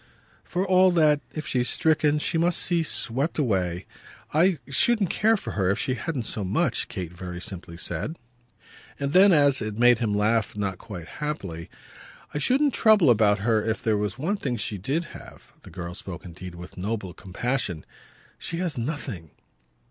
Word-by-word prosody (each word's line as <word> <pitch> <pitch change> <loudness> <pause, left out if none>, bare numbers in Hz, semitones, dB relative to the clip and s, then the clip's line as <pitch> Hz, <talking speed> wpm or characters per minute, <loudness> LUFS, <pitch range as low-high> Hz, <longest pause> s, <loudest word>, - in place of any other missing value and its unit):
"For 185 +2 -2
all 185 0 +5
that, 150 -3 +4
if 155 - -5
she's 125 -1 0
stricken, 155 -1 +2
she 150 - -1
must 175 +1 +2
see 175 -1 +1
swept 140 -1 -1
away. 95 - 0 0.5
I 170 +3 +4
shouldn't 200 - +2
care 220 +2 +3
for - - -6
her 95 -3 0
if 100 - +1
she 130 - -1
hadn't 130 +2 -3
so 110 -1 -2
much," 115 - 0
Kate 90 -4 -6
very 90 0 -7
simply 85 -2 -7
said. 90 - -3 0.8
And 140 0 -1
then 190 +2 +7
as 145 -5 +4
it 110 -1 -4
made 120 0 +5
him 110 -4 0
laugh 105 0 +1
not 95 -3 -2
quite 90 -6 -8
happily: 95 - -4 0.6
"I 150 - -1
shouldn't 270 - +2
trouble 210 - +5
about 105 -3 +3
her 110 0 +2
if 110 0 -2
there 110 -2 +2
were 105 0 0
one 175 +10 -1
thing 130 -10 -2
she 105 -1 -3
did 140 - -1
have." - - -13
The - - -13
girl 85 0 -6
spoke 90 0 -7
indeed 90 +1 -9
with 90 +2 -11
a - - -7
noble 100 -2 -3
compassion. 95 -2 -3 0.5
"She 165 - -4
has 170 -7 -2
nothing." 115 - -4
120 Hz, 180 wpm, -25 LUFS, 95-160 Hz, 0.8 s, then